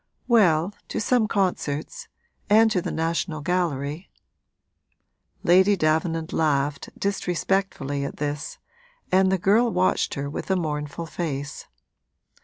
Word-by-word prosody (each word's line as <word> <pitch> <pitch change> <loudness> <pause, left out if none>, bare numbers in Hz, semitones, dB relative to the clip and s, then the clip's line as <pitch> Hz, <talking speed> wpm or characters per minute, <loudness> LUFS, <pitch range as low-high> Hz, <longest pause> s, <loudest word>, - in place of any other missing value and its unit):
'Well, 190 -6 +4
to - - -3
some 225 0 +2
concerts 195 - -2 0.4
and 220 +2 +6
to 185 - +1
the - - -4
National 160 -1 -2
Gallery.' 160 -1 -2 1.3
Lady 190 +4 +5
Davenant 160 0 0
laughed, 145 -2 0
disrespectfully, 180 -6 -1
at 140 - -5
this, 145 0 -4 0.5
and 190 0 +4
the 190 - +2
girl 210 +7 +3
watched 185 -1 +1
her 140 0 -3
with 145 - -6
a 190 - +3
mournful 150 -2 -3
face. 145 -4 -5
170 Hz, 115 wpm, -24 LUFS, 150-195 Hz, 1.3 s, and